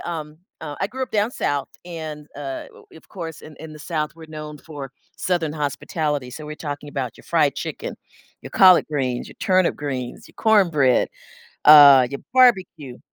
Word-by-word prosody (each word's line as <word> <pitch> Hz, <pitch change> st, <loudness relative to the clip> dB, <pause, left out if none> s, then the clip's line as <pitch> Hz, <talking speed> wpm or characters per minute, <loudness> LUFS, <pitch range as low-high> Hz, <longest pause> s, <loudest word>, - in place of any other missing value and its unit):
um, 155 Hz, -2 st, -6 dB, 0.2 s
uh, 150 Hz, -2 st, -6 dB
I 195 Hz, -, +1 dB
grew 260 Hz, +3 st, -5 dB
up 255 Hz, -, -4 dB
down 210 Hz, +2 st, +1 dB
south, 140 Hz, -, -2 dB, 0.2 s
and, 155 Hz, -4 st, -8 dB
uh, 135 Hz, -2 st, -6 dB, 0.3 s
of 160 Hz, -, -17 dB
course, 165 Hz, -5 st, -7 dB
in 155 Hz, -, -13 dB
in 160 Hz, -1 st, -10 dB
the 155 Hz, -, -12 dB
South, 150 Hz, -1 st, -3 dB
we're 160 Hz, -1 st, -13 dB
known 150 Hz, -1 st, -8 dB
for 145 Hz, -4 st, -9 dB, 0.2 s
southern 170 Hz, -4 st, -1 dB
hospitality, 150 Hz, -2 st, -3 dB
so 150 Hz, +4 st, -9 dB
we're 150 Hz, -, -6 dB
talking 145 Hz, -1 st, -6 dB
about 130 Hz, -5 st, -4 dB
your -, -, -17 dB
fried -, -, +1 dB
chicken, -, -, -5 dB, 0.5 s
your -, -, -9 dB
collard 185 Hz, -2 st, +6 dB
greens, 130 Hz, -5 st, -2 dB
your -, -, -13 dB
turnip 185 Hz, -3 st, +2 dB
greens, 130 Hz, -4 st, -5 dB
your -, -, -21 dB
cornbread, 170 Hz, -, +3 dB, 0.6 s
uh, 140 Hz, -4 st, +9 dB
your 140 Hz, -, -6 dB
barbecue. 185 Hz, -, +3 dB
150 Hz, 175 wpm, -22 LUFS, 145-170 Hz, 0.6 s, uh